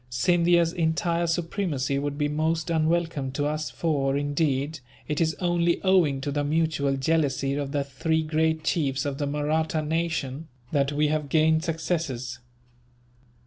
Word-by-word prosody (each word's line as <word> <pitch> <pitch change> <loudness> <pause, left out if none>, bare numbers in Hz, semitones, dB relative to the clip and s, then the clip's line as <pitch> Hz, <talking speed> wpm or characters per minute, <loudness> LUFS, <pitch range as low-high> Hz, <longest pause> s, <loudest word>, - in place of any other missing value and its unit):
Scindia's 170 +5 +3
entire 170 0 0
supremacy 165 -5 -1
would 145 0 -3
be 145 -1 +1
most 160 +3 -1
unwelcome 160 -4 0
to 145 +1 -1
us 155 +1 -2
for, 140 -4 0
indeed, 145 0 0 0.3
it 150 +2 -1
is 160 -1 +1
only 175 -1 +1
owing 175 -8 +3
to 145 - -2
the 145 +1 0
mutual 145 -2 +1
jealousy 140 -2 +1
of 140 -1 -3
the 145 -1 0
three 160 +4 -1
great 160 0 0
chiefs 140 -6 0
of 140 -1 -3
the 145 - -1
Mahratta 155 +2 0
nation, 160 -2 -2 0.2
that 140 -2 +1
we 150 +1 +1
have 150 -2 -1
gained 160 +1 +3
successes. 155 -8 -2
155 Hz, 145 wpm, -26 LUFS, 140-165 Hz, 0.3 s, Scindia's